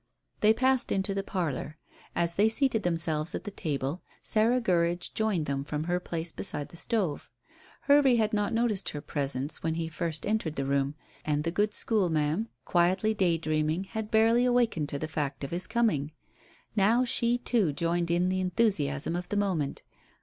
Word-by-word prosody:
They 215 - +5
passed 260 +3 +2
into 195 0 0
the 195 - -1
parlour. 155 -6 -3 0.4
As 170 0 +1
they 210 +5 +3
seated 235 -1 +1
themselves 165 -3 0
at - - -5
the 205 - -6
table, 145 -1 -3 0.2
Sarah 225 +3 +2
Gurridge 175 -5 0
joined 210 -8 0
them 140 -1 -2
from 150 +1 -3
her 175 +2 0
place 165 -2 -4
beside 145 -6 -4
the - - -14
stove. 180 -4 -2 0.5
Hervey 280 -3 +5
had 220 -2 +1
not 205 -1 +1
noticed 225 -4 +1
her 145 - -5
presence 140 0 -3
when 160 0 -1
he 165 -1 -2
first 160 -1 -2
entered 205 -7 -1
the 135 - -2
room, 140 +1 0 0.3
and 150 -1 0
the 165 - -1
good 210 +4 0
school 210 -6 +1
ma'am, 155 +8 0 0.2
quietly 185 +5 +2
day 180 -5 +2
dreaming, 155 +2 0
had 215 +2 -5
barely 225 +2 +4
awakened 240 -12 +1
to 140 - -3
the 155 - -3
fact 145 -3 -3
of 140 - -4
his 180 +2 -3
coming. 155 -12 0 0.6
Now 225 +5 +4
she, 235 0 +2
too, 230 -8 +1
joined 170 +2 -1
in 175 +2 +2
the 185 0 0
enthusiasm 170 -6 0
of 180 0 -4
the 205 - -1
moment. 180 -9 -1
175 Hz, 180 wpm, -29 LUFS, 155-215 Hz, 0.6 s, They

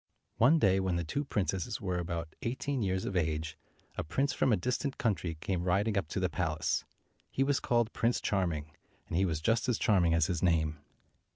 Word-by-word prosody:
One 135 +8 +6
day, 95 -8 +4
when 95 -2 0
the 85 - 0
two 140 - -2
princesses 100 - -2
were 90 -2 -2
about 85 -2 -3
213 - - -1
eighteen 135 0 -2
years 95 -2 0
of 95 - -3
age, 80 -2 -1 0.4
a - - 0
prince 135 - 0
from 130 - +2
a 110 - +4
distant 125 +8 -2
country 90 -8 -1
came 90 -1 -1
riding 100 +4 +1
up 100 -6 0
to 80 - -3
the 90 - +2
palace. 80 -4 -1 0.5
He 135 - +1
was 140 0 +2
called 120 -2 +1
Prince 120 +1 +1
Charming, 85 -7 -1 0.4
and 85 - -4
he 95 +3 +3
was 80 -4 -1
just 115 +7 +1
as 120 - +2
charming 85 -6 +3
as 80 -2 +3
his 90 -3 -2
name. 80 -4 +1
95 Hz, 205 wpm, -31 LUFS, 85-115 Hz, 0.5 s, One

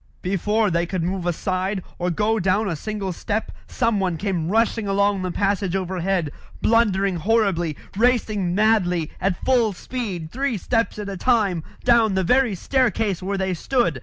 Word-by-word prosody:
Before 205 +3 +1
they 170 +1 0
could 185 -2 -2
move 180 0 -2
aside, 185 +2 -1 0.2
or 180 0 0
go 215 +6 +1
down 195 +3 +1
a 175 - -1
single 200 +2 -4
step, 215 +5 -3 0.2
someone 200 -8 0
came 175 -4 -2
rushing 225 0 +1
along 200 0 +2
the 185 - -2
passage 195 0 0
overhead, 185 -3 -1 0.3
blundering 200 -5 +2
horribly, 185 -5 +1 0.2
racing 215 -5 +1
madly, 185 -6 +2
at 185 -1 -1
full 240 -5 +3
speed, 185 -7 -5
three 265 -2 -1
steps 230 +4 0
at 210 -1 -5
a 195 -1 -5
time, 205 -6 +2 0.2
down 230 -5 +4
the 190 - +1
very 250 +2 +3
staircase 225 -4 0
where 195 +2 -2
they 190 -1 -1
stood. 175 - 0
195 Hz, 160 wpm, -22 LUFS, 180-220 Hz, 0.3 s, down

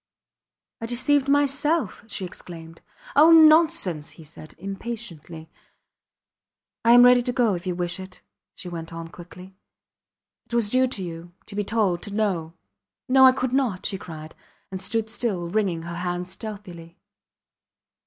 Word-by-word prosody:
I 230 - -4
deceived 275 +3 +1
myself! 285 - +1
she 200 -3 -5
exclaimed. 165 -2 -11 0.3
Oh! 305 +3 +7
Nonsense! 315 - +5
he 165 - -12
said, 155 0 -13
impatiently. 175 -5 -8 1.4
I 235 - +6
am 245 0 +8
ready 245 0 +6
to 245 +1 -2
go 240 -4 +2
if 175 +1 -5
you 180 - -1
wish 175 0 -3
it, 185 0 -11 0.3
she - - -9
went 165 -2 -7
on, 165 0 -7
quickly. 180 +2 -13 0.9
It 235 - -5
was 220 -3 +1
due 255 0 +3
to 210 -7 -5
you 170 0 -8
to 200 - -11
be 205 - -1
told 200 -5 0
to 205 -1 -7
know. 175 -7 -1 0.5
No! 265 0 +7
I - - +8
could 255 -1 -3
not! 250 -9 0
she 195 - -3
cried, 155 -3 -10 0.4
and 190 -1 -5
stood 225 +2 -2
still 215 -6 -3
wringing 180 -3 -1
her 170 0 -6
hands 180 0 -4
stealthily. 190 -6 -9
195 Hz, 155 wpm, -24 LUFS, 175-245 Hz, 1.4 s, am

